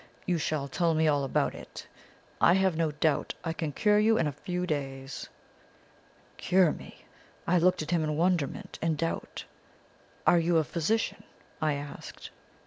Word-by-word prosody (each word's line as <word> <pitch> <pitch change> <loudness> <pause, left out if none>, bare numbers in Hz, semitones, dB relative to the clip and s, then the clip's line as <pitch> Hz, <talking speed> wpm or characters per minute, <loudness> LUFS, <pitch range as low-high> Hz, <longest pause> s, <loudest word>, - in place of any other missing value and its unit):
You 175 -2 +1
shall 150 -2 -1
tell 165 +4 +1
me 160 0 +3
all 145 -2 +2
about 135 - 0
it. - - -10 0.6
I 170 - +6
have 190 -3 +2
no 165 -1 +1
doubt 150 0 0
I 165 -2 -2
can 160 -2 -3
cure 210 +8 +3
you 220 +1 +4
in 165 - +2
a 150 - 0
few 180 +5 -4
days.' 135 -4 -4 1.1
"Cure 180 -3 +3
me? - - -11 0.4
I 180 +1 +3
looked 180 -1 +3
at 155 - -6
him 170 -2 +2
in 155 -1 -1
wonderment 170 -4 -1
and 160 -2 0
doubt. 165 +2 -3 0.8
"'Are 175 - +6
you 165 0 +2
a 160 - +4
physician?' 170 +9 -1 0.4
I 155 -1 +2
asked. 145 0 -8
160 Hz, 165 wpm, -29 LUFS, 150-180 Hz, 1.1 s, I